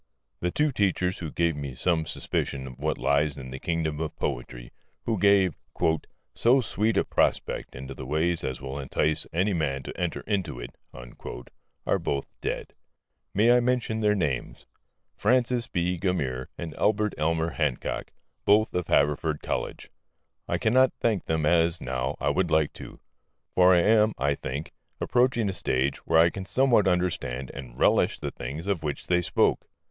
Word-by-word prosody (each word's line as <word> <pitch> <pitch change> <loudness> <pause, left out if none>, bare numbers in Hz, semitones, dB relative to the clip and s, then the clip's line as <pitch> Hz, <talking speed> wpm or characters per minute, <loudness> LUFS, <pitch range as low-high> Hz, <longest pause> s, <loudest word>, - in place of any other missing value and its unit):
The 90 - 0
two 150 +10 +1
teachers 95 -5 0
who 85 - -4
first - - -11
gave 85 -2 +2
me 70 -3 -5
some 80 +1 +1
suspicion 65 -2 -2
of 65 -2 -10
what - - -1
lies 70 0 +1
in 65 -2 -8
the 65 - -6
kingdom 80 -2 -2
of 80 -1 -4
poetry - - -4 0.3
who 110 -4 0
gave 100 -3 +4 0.8
"so 125 +4 +4
sweet 110 -3 0
a - - +4
prospect - - 0
into 65 +1 -7
the 65 - -8
way 80 +4 +1
as 65 -6 -3
will 70 +1 -5
entice 75 +3 0
any 95 +5 +1
man 70 -5 -1
to - - -7
enter 90 -2 -2
into 95 - -2
it" - - -8 1.1
are - - +2
both 70 -1 -2 0.2
dead. - - -3 0.6
May 110 +4 +5
I - - +5
mention 120 -2 0
their 105 -1 +3
names? 70 -10 -2 0.5
Francis 120 +1 +2
B. 90 0 -1
Gummere 70 -10 -1
and 80 -2 -6
Albert 105 0 +2
Elmer 80 +1 +1
Hancock, 75 -6 -2 0.3
both 105 +2 +4
of 90 -1 -1
Haverford 75 +1 +1
College. - - -4 0.6
I - - 0
cannot 130 +3 +3
thank 110 -6 0
them 80 -1 0
as, 85 +1 +3
now, 65 +2 -2
I - - +1
would 95 -2 +1
like 80 -1 +2
to. - - -10 0.5
For 90 0 +6
I 85 - +5
am 110 +2 +4
(I 70 +2 +1
think) 70 +2 -5 0.3
approaching 120 -3 +2
a 95 - -1
stage 65 -5 0
where - - +4
I 85 +1 +6
can 95 -1 -6
somewhat 125 -7 +3
understand 85 -8 -1
and 65 -3 -9
relish - - +3
the - - -4
things 70 +8 -6
of 100 -5 -1
which 75 -2 -4
they 90 0 +2
spoke. - - +1
85 Hz, 170 wpm, -27 LUFS, 70-100 Hz, 1.1 s, For